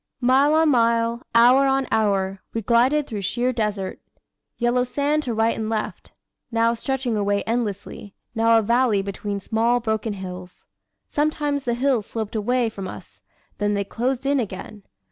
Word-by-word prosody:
Mile 270 +4 +4
on 320 0 +4
mile, 230 -2 +2
hour 250 +4 +6
on 270 0 +1
hour, 195 -3 +1
we 225 - -2
glided 250 +7 +3
through 215 -7 -5
sheer 245 +6 -1
desert. 210 -5 -2 0.6
Yellow 240 +1 +2
sand 290 +4 0
to 245 -6 -3
right 225 +1 +2
and 220 -1 -3
left 220 -1 -4 0.4
now 230 0 +2
stretching 250 0 -2
away 205 -1 0
endlessly, 210 -3 -4 0.2
now 225 0 +4
a 225 - +2
valley 235 -2 +2
between 200 +1 -4
small 230 +4 +1
broken 220 -2 -2
hills. 180 -2 -9 0.4
Sometimes 295 -2 -1
the 240 -1 0
hills 245 -4 +1
sloped 220 -1 -5
away 240 +3 +1
from 200 -4 -6
us, - - -11 0.4
then 205 0 +1
they 200 - 0
closed 250 +6 -2
in 280 0 +2
again. 210 -1 -6
230 Hz, 160 wpm, -23 LUFS, 205-255 Hz, 0.6 s, hour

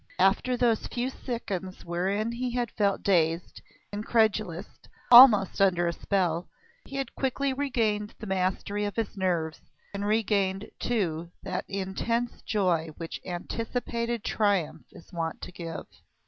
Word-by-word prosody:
After 195 +7 +3
those 235 -3 +2
few 250 +2 -2
seconds 195 -8 -5
wherein 195 +6 -1
he 250 +2 -2
had 240 -3 -1
felt 200 -2 0
dazed, 170 -3 +1 0.3
incredulous, 215 -4 +1 0.5
almost 235 -7 +9
under 175 -3 +4
a 170 - 0
spell, 175 -2 0 0.4
he 275 - -9
had 270 -3 -3
quickly 270 +1 -1
regained 225 -7 -1
the 220 - -8
mastery 190 +2 -1
of 205 - -4
his 225 -3 -2
nerves, 170 -5 -1 0.3
and 200 0 -3
regained, 205 -2 +1
too, 170 -8 -1
that 185 -1 -3
intense 200 +5 -2
joy 180 -6 +1
which 165 -1 -6
anticipated 235 +5 -3
triumph 200 -7 0
is 170 - -16
wont 165 -1 -3
to - - -6
give. 165 -2 -6
200 Hz, 135 wpm, -28 LUFS, 180-230 Hz, 0.5 s, almost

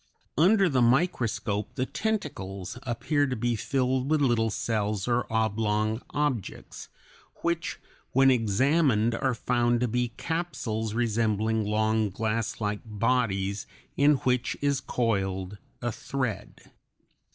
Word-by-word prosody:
Under 195 - +5
the 135 -6 +2
microscope 120 - +1
the 130 - 0
tentacles 125 - -3
appear 140 +4 0
to 130 - -2
be 120 +1 0
filled 130 +2 0
with 155 0 +3
little 120 -5 +2
cells 105 -2 -1
or 120 -1 0
oblong 110 0 0
objects, 145 -8 -3 0.5
which 170 -1 -1 0.3
when 135 +1 +5
examined 120 +1 +2
are 130 +2 0
found 120 +1 +1
to 125 - +2
be 120 +2 0
capsules 125 -10 -2
(C) 105 - -6
resembling 110 -1 +1
long 110 0 +1
glasslike 105 0 -2
bodies 105 -3 0 0.3
in 145 +1 +5
which 125 -1 +1
is 140 -1 +1
coiled 100 -4 -1 0.2
a 120 - 0
thread. 125 -1 -5
120 Hz, 120 wpm, -27 LUFS, 110-130 Hz, 0.5 s, Under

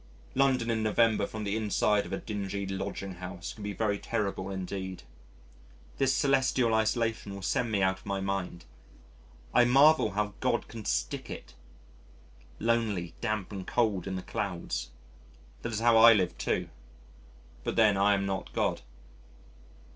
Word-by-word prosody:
London 130 -4 +2
in 110 -1 0
November 110 +1 +2
from 110 -1 -6
the 100 0 -1
inside 105 -1 +1
of - - -10
a - - -1
dingy 100 -2 -4
lodging 95 0 -4
house 90 0 -6
can 110 - -12
be 105 0 -3
very 100 -1 -1
terrible 100 -2 -2
indeed. 95 -1 -5 1.0
This 135 -1 +3
celestial 130 -3 +2
isolation 110 -2 0
will 100 - -8
send 120 +3 0
me 100 -3 +1
out 95 0 +1
of - - -16
my 100 0 -1
mind. 95 -3 -3 0.9
I - - +6
marvel 135 -3 +5
how 105 0 -1
God - - 0
can 110 -2 -9
stick - - -2
it - - -8 1.0
lonely, 110 -7 0
damp, 105 -2 -2
and 95 -2 -6
cold 105 -7 +1
in 95 - -3
the 95 - -5
clouds. 100 - -3 0.7
That - - -4
is 110 0 -2
how 115 -1 +5
I 115 +1 +9
live 95 -5 +1
too - - -1 0.9
but - - -2
then 110 -3 +5
I 100 +1 +4
am 100 0 -1
not 95 -1 -3
God. - - 0
105 Hz, 155 wpm, -29 LUFS, 95-115 Hz, 1.0 s, I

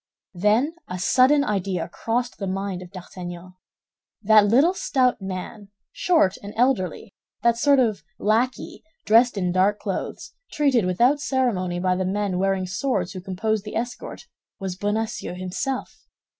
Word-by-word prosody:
Then 210 - +2
a 180 - -5
sudden 260 +9 +4
idea 195 -6 -1
crossed 240 +7 -3
the 195 - -3
mind 190 -1 -3
of 180 - -10
D'Artagnan. 180 -1 -9 0.7
That 215 0 +6
little 275 - +4
stout 255 - +1
man, 195 +2 -6 0.2
short 320 - +2
and 205 +1 -9
elderly, 225 -8 0 0.3
that 235 -1 +4
sort 280 +4 +4
of 220 - +1 0.2
lackey, 230 +4 -1 0.2
dressed 230 +1 +4
in 180 -2 0
dark 190 +3 +2
clothes, 195 -3 -5 0.2
treated 270 -8 +2
without 245 +11 +3
ceremony 210 -11 0
by 185 0 +1
the 185 0 -1
men 195 -1 -1
wearing 195 -1 +1
swords 195 -2 -2
who 185 - -7
composed 195 +3 -2
the 210 - -7
escort, 240 +2 -5 0.3
was 190 -2 -4
Bonacieux 210 0 -2
himself. 185 +9 -4
205 Hz, 145 wpm, -23 LUFS, 185-245 Hz, 0.7 s, That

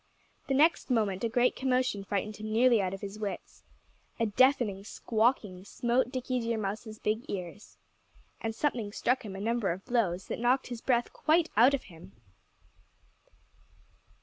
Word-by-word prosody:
The 270 - +1
next 310 +3 +3
moment 210 -5 0
a 230 - +1
great 245 +2 +2
commotion 255 -5 0
frightened 205 +2 -3
him 215 0 -6
nearly 235 0 +4
out 185 -1 -1
of 195 - -7
his 200 +1 -7
wits. 205 -2 -6 0.6
A 230 - +2
deafening 220 -3 +2
squawking 220 -4 0
smote 240 +5 0
Dickie 255 -1 -2
Deer 230 -1 -1
Mouse's 215 +1 -4
big 215 +3 -1
ears. 185 +1 -7 0.6
And 225 -1 -3
something 235 -8 -1
struck 250 +4 0
him 200 -3 -7
a - - -6
number 225 0 0
of 185 +3 -6
blows 200 -8 0
that - - -5
knocked 250 +3 +1
his 240 -2 -6
breath 240 -2 +1
quite 325 +1 +2
out 245 +6 +6
of 270 - -6
him. 180 +1 -14
225 Hz, 160 wpm, -30 LUFS, 200-250 Hz, 0.6 s, out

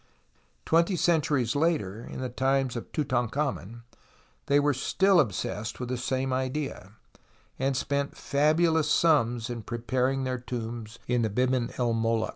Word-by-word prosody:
Twenty 170 +3 +3
centuries 150 -8 +1
later, 140 - 0
in - - -7
the 130 - -2
times 135 0 0
of 120 - -6
Tutankliamen, 125 - -2 0.6
they 145 0 +4
were 145 0 +2
still 190 +8 +3
obsessed 110 - -2
with 125 -1 -4
the 130 - -1
same 130 +1 -1
idea, 130 -6 -3 0.7
and 135 0 0
spent 140 +1 -2
fabulous 155 +2 +2
sums 120 -9 +3
in 120 -2 -5
preparing 125 +4 -1
their 130 -1 -2
tombs 115 -2 -6
in 125 -1 +1
the 110 - +1
Biban 125 +2 +1
el 120 -2 +1
Moluk. 115 0 0
130 Hz, 140 wpm, -28 LUFS, 120-145 Hz, 0.7 s, they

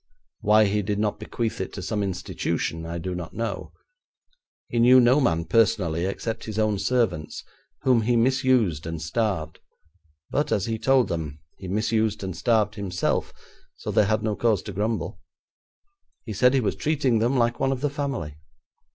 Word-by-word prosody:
Why 105 +1 +5
he 105 +1 +1
did 105 +1 -2
not 105 0 -1
bequeath 110 0 -3
it 95 - -4
to 95 - -6
some 105 +2 -2
institution, 90 -3 -3
I 85 +1 -4
do 90 +2 -4
not 90 -3 -6
know. 115 0 -4 1.0
He 120 - -1
knew 125 +2 +7
no 125 +3 +5
man 85 -8 +1
personally 100 -7 +2
except 110 +3 -4
his 110 -1 -6
own 110 -2 +1
servants, 105 -7 -1 0.4
whom 125 -3 +4
he 120 +2 +1
misused 120 - +2
and 80 -1 -4
starved, 85 -1 -2 0.7
but, 145 - 0
as 100 -2 +1
he 115 -1 -2
told 135 0 +3
them, 75 -3 -4 0.2
he 95 - -7
misused 110 +1 0
and 95 -3 -4
starved 110 -3 +2
himself, 95 -4 -1 0.4
so - - -5
they 105 - +4
had 110 +2 0
no 110 -1 0
cause 110 -4 +1
to 100 - -7
grumble. 110 +4 -2 1.1
He 110 - -5
said 125 +6 +4
he 135 - +3
was 110 - -1
treating 140 -7 +1
them 120 +4 +1
like 120 -1 +1
one 135 - +1
of 130 -2 -3
the 145 - +1
family. 135 - -4
110 Hz, 175 wpm, -25 LUFS, 95-120 Hz, 1.1 s, knew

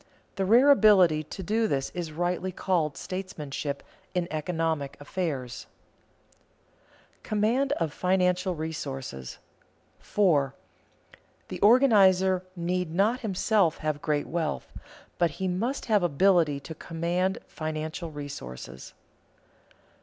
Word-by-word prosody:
The 195 - 0
rare 245 +8 +6
ability 190 - +5
to 170 +5 -8
do 220 +5 +1
this 135 -7 -1
is 175 -3 -5
rightly 175 +3 -1
called 170 -5 0
statemanship 150 -6 -5 0.3
in 175 -1 0
economic 160 -2 -2
affairs. 145 -5 -4 1.5
[Sidenote: - - -38
Command 230 +6 +1
of 165 - -2
financial 180 0 +1
resources] 135 - -5 0.6
4. 150 -10 +2 0.9
_The - - -6
organizer 195 -6 +5
need 180 -1 -2
not 215 +7 +2
himself 200 -4 +1
have 155 -2 -2
great 150 -2 0
wealth, 165 -2 -3 0.5
but 170 -1 +3
he 190 - -1
must 225 +10 -2
have 215 -3 +3
ability 170 -2 +3
to 160 - -8
command 175 +4 -1
financial 155 +1 -5
resources. 65 - -8
175 Hz, 110 wpm, -27 LUFS, 155-190 Hz, 1.5 s, rare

